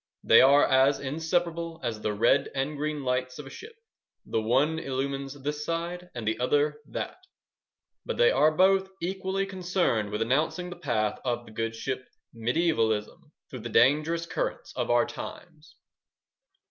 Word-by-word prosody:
They 115 Hz, -, +7 dB
are 140 Hz, +2 st, +6 dB
as 135 Hz, +1 st, +4 dB
inseparable 165 Hz, +3 st, -2 dB
as 115 Hz, -3 st, -3 dB
the 105 Hz, -, -1 dB
red 115 Hz, +6 st, +3 dB
and 135 Hz, +3 st, -1 dB
green 150 Hz, 0 st, -3 dB
lights 125 Hz, 0 st, -1 dB
of 150 Hz, -, -8 dB
a 135 Hz, -, -10 dB
ship: 450 Hz, +1 st, -11 dB, 0.5 s
the 110 Hz, -, -1 dB
one 140 Hz, +8 st, +2 dB
illumines 135 Hz, 0 st, -3 dB
this 150 Hz, +1 st, -2 dB
side 170 Hz, +2 st, -4 dB
and 115 Hz, -3 st, -5 dB
the 110 Hz, +1 st, 0 dB
other 150 Hz, +4 st, +1 dB
that, -, -, -5 dB, 0.9 s
but -, -, -4 dB
they 485 Hz, 0 st, +5 dB
are 155 Hz, -, +4 dB
both 190 Hz, +3 st, +3 dB
equally 190 Hz, +2 st, -2 dB
concerned 180 Hz, -, 0 dB
with 105 Hz, +2 st, -1 dB
announcing 155 Hz, +8 st, 0 dB
the -, -, -6 dB
path 120 Hz, -10 st, -1 dB
of 120 Hz, -1 st, -2 dB
the -, -, -13 dB
good 115 Hz, +1 st, -3 dB
ship 130 Hz, +3 st, -3 dB, 0.3 s
"Mediaevalism" 115 Hz, -3 st, 0 dB, 0.2 s
through -, -, -6 dB
the -, -, -6 dB
dangerous 155 Hz, +6 st, +3 dB
currents -, -, -4 dB
of -, -, -2 dB
our 120 Hz, 0 st, +4 dB
times. 160 Hz, -2 st, -10 dB
145 Hz, 160 wpm, -27 LUFS, 120-170 Hz, 0.9 s, They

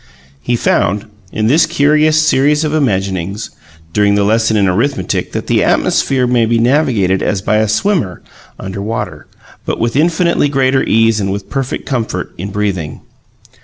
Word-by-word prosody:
He 120 Hz, -, -1 dB
found, 105 Hz, -2 st, 0 dB, 0.3 s
in 110 Hz, -, -2 dB
this 150 Hz, +9 st, +3 dB
curious 155 Hz, +2 st, +3 dB
series 150 Hz, 0 st, +2 dB
of 155 Hz, -1 st, -1 dB
imaginings, 100 Hz, -, -2 dB, 0.4 s
during 100 Hz, -1 st, +2 dB
the 100 Hz, -, +2 dB
lesson 110 Hz, +1 st, +2 dB
in 100 Hz, -2 st, +2 dB
arithmetic, 95 Hz, +1 st, -1 dB
that -, -, -3 dB
the -, -, +1 dB
atmosphere 130 Hz, -2 st, +1 dB
may 120 Hz, -2 st, +2 dB
be 115 Hz, +1 st, +1 dB
navigated 115 Hz, -7 st, +1 dB
as 100 Hz, -2 st, -1 dB
by 105 Hz, -, +1 dB
a 110 Hz, 0 st, +2 dB
swimmer 115 Hz, -, -1 dB, 0.4 s
under 95 Hz, +1 st, -6 dB
water, 110 Hz, +3 st, -5 dB, 0.4 s
but -, -, -3 dB
with 115 Hz, +1 st, -1 dB
infinitely 170 Hz, 0 st, +2 dB
greater 135 Hz, -1 st, +2 dB
ease 115 Hz, 0 st, +2 dB
and 100 Hz, -1 st, -1 dB
with 100 Hz, 0 st, -6 dB
perfect 135 Hz, -2 st, -3 dB
comfort 120 Hz, -5 st, -3 dB
in 100 Hz, +3 st, -4 dB
breathing. 100 Hz, -7 st, -3 dB
115 Hz, 160 wpm, -14 LUFS, 100-140 Hz, 0.4 s, this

